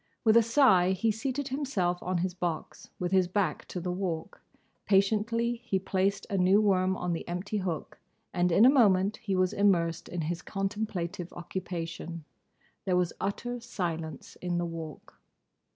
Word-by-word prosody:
With 220 -1 +5
a 235 - +8
sigh 220 -7 +4
he 220 +4 +1
seated 265 +6 -3
himself 215 -11 -1
on 185 0 -1
his 185 - -3
box, 175 -3 -4
with 180 0 -2
his 185 -2 +4
back 185 -4 -1
to 180 - -5
the 180 +1 -3
Walk; 180 -3 -4 0.5
patiently 225 +4 +2
he 200 -5 0
placed 195 +1 0
a 195 - -1
new 185 +3 +5
worm 190 -3 +2
on 180 -1 -1
the 165 - -5
empty 180 +5 -3
hook, 175 -5 -4 0.3
and 180 -1 +2
in 200 +7 +6
a - - +9
moment 205 -6 +4
he 210 -5 -2
was 185 0 +2
immersed 175 -5 +2
in 175 -1 -3
his 165 +2 -3
contemplative 195 -4 -3
occupation. 170 -2 -5 0.6
There 185 -2 +1
was 180 -2 +1
utter 245 +5 -2
silence 165 - -5
in 175 -1 -2
the 175 - 0
Walk. 165 -3 -8
185 Hz, 165 wpm, -29 LUFS, 175-210 Hz, 0.6 s, a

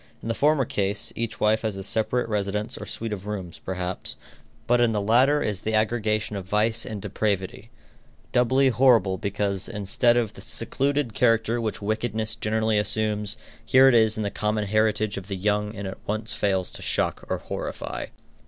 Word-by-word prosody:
In - - -4
the - - +1
former 145 +1 +2
case, 100 -2 -1
each 115 -1 -3
wife 110 +1 +3
has 110 -3 -2
a 95 - -5
separate 115 +5 +1
residence 105 +2 -1
or - - -7
suite 115 -1 -3
of 100 0 -7
rooms, 95 -5 -5
perhaps; 90 -1 -3 0.5
but 120 0 +3
in 115 -2 +3
the 105 - 0
latter 125 +8 +3
is 105 -2 -2
the 110 0 -1
aggregation 110 -1 0
of 95 -2 -5
vice 110 +3 +1
and 105 - -5
depravity, 100 +1 -2 0.6
doubly 130 +2 +3
horrible 115 -8 +4
because, 100 -1 -1
instead 110 +3 +2
of 115 -4 0
the - - -11
secluded 140 -3 -1
character 115 +1 +2
which 110 -2 -3
wickedness 110 +1 -1
generally 110 0 +1
assumes, 105 -1 -1 0.3
here 130 +1 +6
it 135 - +5
is 110 -2 +4
the 105 -2 -2
common 105 0 -1
heritage 110 0 +1
of 95 -1 -7
the 100 - -3
young 105 +2 0
and 100 -1 -5
at 95 - -7
once 110 +1 -1
fails 95 -3 0
to - - -7
shock - - 0
or - - 0
horrify. - - -5
110 Hz, 180 wpm, -25 LUFS, 100-115 Hz, 0.6 s, here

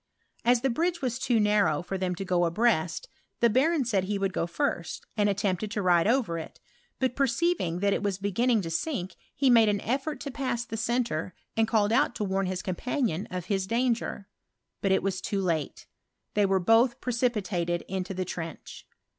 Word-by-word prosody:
As 240 0 +4
the 265 0 +1
bridge 335 +4 -1
was 250 -1 -1
too 240 -3 +2
narrow 210 -7 +2
for 195 - -4
them 185 -1 -1
to 195 +2 -5
go 175 -1 +2
abreast, 185 - +1 0.3
the 235 -2 +4
baron 280 +4 +2
said 200 -5 +1
he 205 +1 -1
would 195 -1 -1
);o 165 - 0
tlrst, 170 -1 -2
and 205 -2 +2
attempted 200 0 -1
to 210 -1 -2
ride 175 0 +4
over 225 -9 +1
it; 160 - -9 0.4
but 260 -1 0
perceiving 265 - +1
that 200 0 +3
it - - -1
was 200 -2 -1
beginning 215 +4 +1
to 165 - -4
sink, 185 - -2 0.2
he 275 0 +2
made 230 -4 +6
an 205 - +2
«tibit 270 +8 -2
to 280 - -5
pass 255 -3 -2
the 225 - -6
centre, 230 -7 -1 0.2
and 225 0 +2
called 215 -2 +2
out 260 0 +2
to - - -2
warn 195 -1 0
his 185 0 -3
compunion 205 - -2
of 180 +1 -5
Ids 190 -1 0
danger; 230 -3 -1 0.5
but 195 - +1
it 190 - +3
was 190 -1 -1
too 200 - -2
late: 165 -6 -2 0.5
tbejt 205 -1 +4
Wftrn 190 -2 +1
liolh 235 +3 +5
preeipitated 205 -8 -1
into 190 0 -3
the 185 0 -2
trench. 165 -2 -7
205 Hz, 195 wpm, -28 LUFS, 185-240 Hz, 0.5 s, made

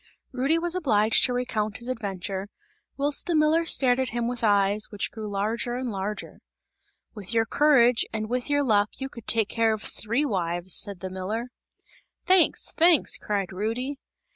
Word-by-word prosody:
Rudy 270 +5 +1
was 340 0 0
obliged 225 - +2
to 250 - -1
recount 215 -4 -2
his 235 - -7
adventure, 200 -5 -4 0.5
whilst 285 +3 0
the 345 - +1
miller 310 +2 +3
stared 255 -5 +4
at 260 -1 0
him 235 0 -2
with 245 -1 -3
eyes, 205 0 +2
which 205 -2 -3
grew 215 -2 -7
larger 220 +4 -2
and 250 -1 -3
larger. 200 +1 -5 0.7
"With 210 0 -7
your 225 0 +3
courage 250 -4 +4
and 215 -1 -3
with 250 +3 -3
your 285 0 +2
luck 210 -5 +2
you 270 0 -5
could 235 -5 -12
take 220 -2 +1
care 225 -1 +1
of 215 - -5
three 235 +7 -2
wives!" 175 -5 -2
said 200 -3 -2
the 185 -1 -5
miller. 210 +6 -4 0.8
"Thanks! 370 -2 +4
Thanks!" 335 -2 +4
cried 200 -3 -3
Rudy. 240 +8 -3
230 Hz, 170 wpm, -25 LUFS, 205-265 Hz, 0.8 s, stared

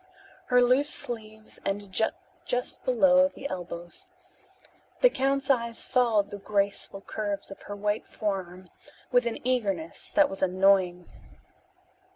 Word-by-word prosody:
Her 250 -1 +5
loose 260 +4 +3
sleeves 220 -4 -3
ended 195 -1 -3 0.5
just 245 0 -3
below 270 +2 +5
the 280 0 -7
elbows. 175 - -7 0.9
The - - +6
count's 275 0 0
eyes 235 -3 0
followed 225 -5 +2
the 205 - -6
graceful 200 -1 -1
curves 200 -1 -4
of 195 - -10
her 205 - -4
white 205 +1 -2
forearm 185 -3 -4 0.4
with 245 -1 +3
an 230 - -2
eagerness 195 -10 -1
that 300 -1 +6
was 195 - -7
annoying. 185 -1 +3
210 Hz, 125 wpm, -27 LUFS, 195-250 Hz, 0.9 s, The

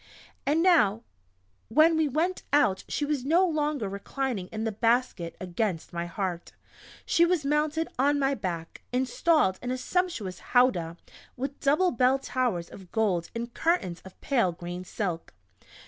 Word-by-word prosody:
And 310 +4 +3
now 230 - +4 0.6
when 310 +8 +5
we 315 -1 +2
went 325 +7 0
out 270 -10 +3
she 295 - -1
was 290 -3 -1
no 335 +7 +4
longer 300 - -1
reclining 200 +1 -3
in 220 +3 -5
the 225 - -1
basket 230 -6 0
against 185 -1 -3
my 170 0 -3
heart; 175 -1 -4 0.5
she 335 - +3
was 340 -4 +2
mounted 300 +2 +1
on 285 +2 +3
my 275 -1 +2
back, 170 -9 -5
installed 255 - +2
in 245 - -4
a 255 - -1
sumptuous 255 - -2
"howdah" 180 -10 +2 0.4
with 270 +2 -4
double 305 +6 +3
bell 255 +3 +3
towers 250 -10 -1
of 190 -3 -13
gold 195 -7 0
and 235 +1 -4
curtains 325 - 0
of 190 - -14
pale 235 -10 +2
green 175 +1 -7
silk. 175 - -4
245 Hz, 150 wpm, -27 LUFS, 190-295 Hz, 0.6 s, when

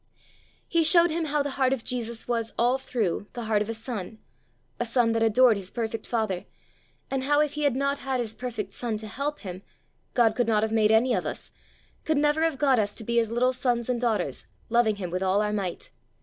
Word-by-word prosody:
He 335 -1 +2
showed 340 +1 +6
him 325 +1 -1
how 295 -1 0
the 285 - -3
heart 260 0 +4
of 250 -4 -4
Jesus 235 -2 -3
was, 230 -2 -1
all 245 +3 +2
through, 210 -7 -2
the 240 - -5
heart 215 -2 +1
of 210 - -2
a - - -1
son, 220 -3 -6 0.6
a - - +1
son 235 0 +2
that 225 0 0
adored 225 0 +5
his 190 -2 -6
perfect 225 0 -4
father; 215 -6 -1 0.7
and 265 -1 -1
how 290 +1 +3
if 300 -1 +1
he 300 0 -1
had 280 -4 +2
not 280 +1 0
had 265 -1 -2
his 225 -2 -3
perfect 225 -5 -5
son 230 -1 -2
to 215 - -8
help 280 +7 -4
him, 185 -2 -7 0.5
God 230 -3 +4
could 245 -1 +1
not 215 -2 +2
have 220 - -1
made 220 -1 +3
any 235 +3 +4
of - - -1
us, - - -5 0.5
could 315 -2 +1
never 295 +2 +2
have 325 -3 +1
got 270 -3 +3
us 205 -1 -1
to 225 - -6
be 235 +2 -1
his 230 -2 +2
little 250 +3 +2
sons 245 -2 0
and 245 -1 0
daughters, 230 -3 -1 0.2
loving 235 -2 +3
him 185 -4 -5
with 180 +1 -2
all 190 +1 +2
our 210 0 0
might. 190 -4 -4
235 Hz, 230 wpm, -26 LUFS, 220-265 Hz, 0.7 s, showed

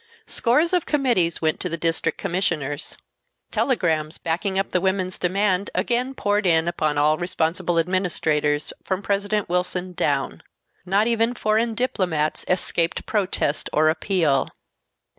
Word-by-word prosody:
Scores 300 +9 +2
of 355 -3 +1
committees 240 - +1
went 155 0 +1
to 180 - -3
the 170 - -3
District 165 0 0
Commissioners. 170 -6 -2 0.5
Telegrams 160 - 0
backing 190 +4 -2
up 195 - -1
the 180 - +1
women's 190 -1 -1
demand 190 +1 +1
again 245 +7 0
poured 205 -3 +1
in 165 -1 +3
upon 155 -4 0
all 150 +1 +3
responsible 175 0 -1
administrators, 160 -4 +1
from 190 +1 -2
President 205 +1 0
Wilson 180 +1 -2
down. 140 -5 -1 0.5
Not 200 +3 +3
even 230 +1 +1
foreign 220 +1 +1
diplomats 180 -11 -1
escaped 170 -2 0
protest 190 -8 -1
or 155 +1 +4
appeal. 160 -4 +1
180 Hz, 130 wpm, -23 LUFS, 160-205 Hz, 0.5 s, or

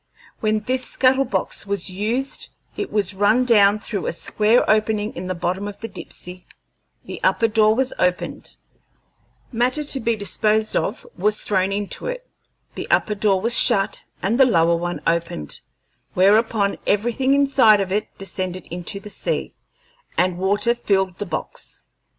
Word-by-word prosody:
When 215 0 0
this 255 +4 0
scuttle 265 +1 +2
box 190 -1 -1
was 200 -2 -1
used 225 +8 -2 0.3
it 410 - -4
was 205 -2 0
run 210 +6 +3
down 210 -4 +5
through 205 -3 -4
a - - 0
square 215 +7 +2
opening 215 0 +1
in 180 +2 -6
the 185 - -2
bottom 180 +3 -2
of 205 - -8
the 225 - -5
Dipsey, 180 -3 -6 0.6
the - - -8
upper 230 - +3
door 215 -1 +3
was 265 +1 0
opened, 180 0 -1 1.0
matter 255 +5 +1
to 285 -2 0
be 230 -1 0
disposed 215 +1 0
of 210 - -2
was 210 +4 0
thrown 190 -1 +1
into 200 - -4
it, - - -5 0.5
the - - -7
upper 210 - +2
door 200 -2 +1
was 230 +3 +1
shut 195 -1 +4 0.2
and 220 +7 0
the 265 - +8
lower 170 -6 +3
one 175 +1 -3
opened, 165 - -2 0.6
whereupon 200 +1 +3
everything 240 +6 +1
inside 270 -7 +5
of 190 -1 -2
it 210 +2 0
descended 185 -1 -4
into 180 +3 -4
the 200 - -12
sea, - - -3 0.6
and 180 0 +1
water 205 +5 +2
filled 190 -6 -1
the 205 - -4
box. 160 -2 -4
205 Hz, 155 wpm, -21 LUFS, 190-230 Hz, 1.0 s, the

